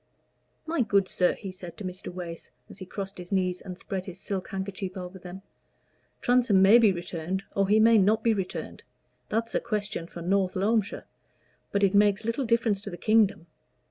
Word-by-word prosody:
"My 325 -3 0
good 200 -4 +2
sir," 180 -1 +2
he 195 -3 -7
said 185 -2 -10
to 210 - -7
Mr. 185 0 -6
Wace, 175 -2 -7 0.2
as - - -12
he 185 - -8
crossed 195 0 -6
his 180 +1 -9
knees 185 -2 0
and 180 -2 -8
spread 190 -1 -5
his 185 0 -8
silk 190 -1 -4
handkerchief 190 0 -5
over 180 +1 -7
them, 180 +2 -10 0.8
"Transome 245 -5 +4
may 200 +5 +7
be 220 -4 +5
returned, 175 +1 -4
or 195 -1 +2
he 210 +2 +4
may 225 0 +6
not 215 +3 +3
be 230 - +4
returned 190 -3 -5 0.5
that's 230 +1 -1
a - - +2
question 210 -6 -3
for 170 -1 -9
North 190 +1 +1
Loamshire; 205 +2 0 0.7
but 200 0 +1
it 195 0 +4
makes 205 +1 +3
little 230 +4 -1
difference 225 -3 +1
to - - -7
the 175 - -7
kingdom. 210 -3 +2
195 Hz, 190 wpm, -27 LUFS, 185-215 Hz, 0.8 s, may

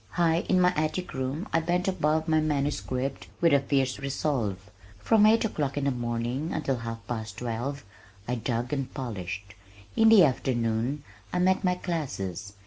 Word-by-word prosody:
High 170 -1 +3
in 185 - +4
my 180 0 +4
attic 155 +4 -1
room 135 +8 -3
I 165 - +4
bent 175 +3 0
above 160 -3 +1
my 155 -1 +3
manuscript 140 -3 -1
with 170 -3 +4
a 140 - +6
fierce 135 -2 0
resolve. 120 -8 -2 0.3
From 210 - +4
eight 225 +1 +4
o'clock 145 -9 -2
in 145 - 0
the 140 - +2
morning 120 +5 -2
until 140 -4 -1
half 115 -2 -6
past 110 -3 -5
twelve, 120 +2 -4 0.4
I 125 - -1
dug 120 +1 -2
and 135 -3 -2
polished. 100 -6 -5 0.4
In 225 0 +6
the 220 -5 +8
afternoon, 125 0 0 0.3
I - - -1
met 185 +2 +3
my 180 -1 +2
classes. 135 - -4
140 Hz, 165 wpm, -27 LUFS, 120-160 Hz, 0.4 s, the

